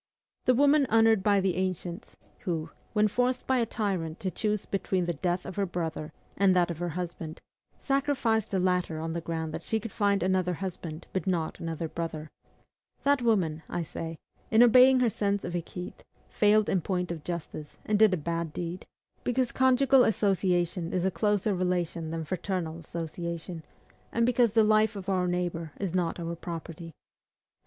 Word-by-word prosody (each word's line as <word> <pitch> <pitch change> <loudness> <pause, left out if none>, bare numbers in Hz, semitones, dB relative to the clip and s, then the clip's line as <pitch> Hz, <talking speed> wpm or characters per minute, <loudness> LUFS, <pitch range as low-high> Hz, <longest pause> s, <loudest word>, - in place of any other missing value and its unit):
The 255 - +4
woman 285 +1 +4
honored 225 -2 +5
by 200 0 +3
the 190 -2 +1
ancients, 185 0 -3 0.2
who, 165 -4 -3 0.2
when 210 0 +4
forced 250 +4 0
by 260 -1 +2
a 230 - +1
tyrant 185 -8 -2
to 185 - -2
choose 210 0 -1
between 190 -2 -1
the 175 - -1
death 175 +3 -1
of 185 - -7
her 200 - +2
brother 165 -3 -4 0.2
and 195 -1 +4
that 175 -1 +3
of 165 - -6
her 175 0 -2
husband, 165 -3 -5 0.4
sacrificed 270 -6 0
the 195 - 0
latter 180 -3 0
on 165 +1 -3
the 170 - -3
ground 160 -1 -3
that - - -4
she 220 - -1
could 220 0 -7
find 200 -2 +1
another 185 -1 +1
husband 170 -3 -6
but 190 +1 -2
not 170 -4 -1
another 165 0 -3
brother, 160 -1 -5 0.7
that 285 -2 +3
woman, 185 -10 +1
I 175 - -2
say, 165 0 -6 0.3
in 225 +2 +6
obeying 255 +2 +7
her 240 - +4
sense 200 0 0
of 175 - -4
equite, 175 +1 -6 0.3
failed 210 0 +3
in 185 - +1
point 180 0 -2
of 160 -3 -6
justice, 165 -3 -6
and 210 -1 +1
did 215 -2 +7
a 185 - +1
bad 165 0 -3
deed, 175 +1 -5 0.4
because 250 0 0
conjugal 260 0 +5
association 180 -5 +1
is 185 0 0
a 190 - +2
closer 210 +1 +1
relation 175 -3 -1
than 165 0 -4
fraternal 175 -2 -3
association, 170 +1 -5 0.5
and 230 0 +2
because 240 -3 +3
the 225 -1 +5
life 215 0 +3
of 195 -1 -6
our 185 -2 +1
neighbor 175 -3 -2
is 195 -4 -2
not 175 -2 0
our 170 0 -3
property. 165 -1 -7
185 Hz, 180 wpm, -28 LUFS, 170-215 Hz, 0.7 s, obeying